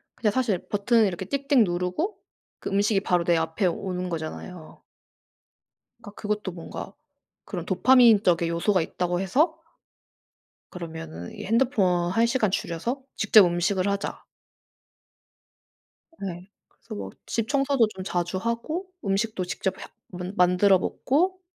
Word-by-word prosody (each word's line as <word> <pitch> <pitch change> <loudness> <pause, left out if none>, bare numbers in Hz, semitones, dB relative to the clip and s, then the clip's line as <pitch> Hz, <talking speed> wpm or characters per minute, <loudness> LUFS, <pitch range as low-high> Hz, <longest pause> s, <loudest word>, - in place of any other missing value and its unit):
그냥 215 -3 +1
사실 220 -5 0
버튼을 220 +2 +3
이렇게 190 0 -4
띡띡 275 +2 +2
누르고 180 - -2 0.4
그 - - -5
음식이 200 +1 +2
바로 180 -3 +1
내 170 0 +3
앞에 160 +4 -1
오는 180 +1 -2
거잖아요. 160 0 -7 1.2
그러니까 205 - -11
그것도 210 -2 -2
뭔가 175 +3 -8 0.5
그런 175 -5 -5
"도파민적의 200 -5 +5
요소가 180 +3 +1
있다."고 175 +2 -2
해서 285 - +2 1.1
그러면은 160 - -8
이 - - -7
핸드폰 200 -7 +2
1 225 +5 +3
시간 235 -4 +1
줄여서 205 +10 -2
직접 215 -2 +6
음식을 180 +2 0
하자. 200 0 -3 2.0
네. 185 0 -6 0.2
그래서 220 - -11
뭐 - - -5 0.2
집 230 -2 -2
청소도 275 -4 +2
좀 190 - -6
자주 175 0 -2
하고 235 - -3 0.2
음식도 195 -1 -1
직접 190 +1 -3
해 - - -7 0.3
만 180 +2 -5
만들어 180 +1 +5
먹고 360 - 0
195 Hz, 280 characters per minute, -25 LUFS, 180-230 Hz, 2.0 s, 직접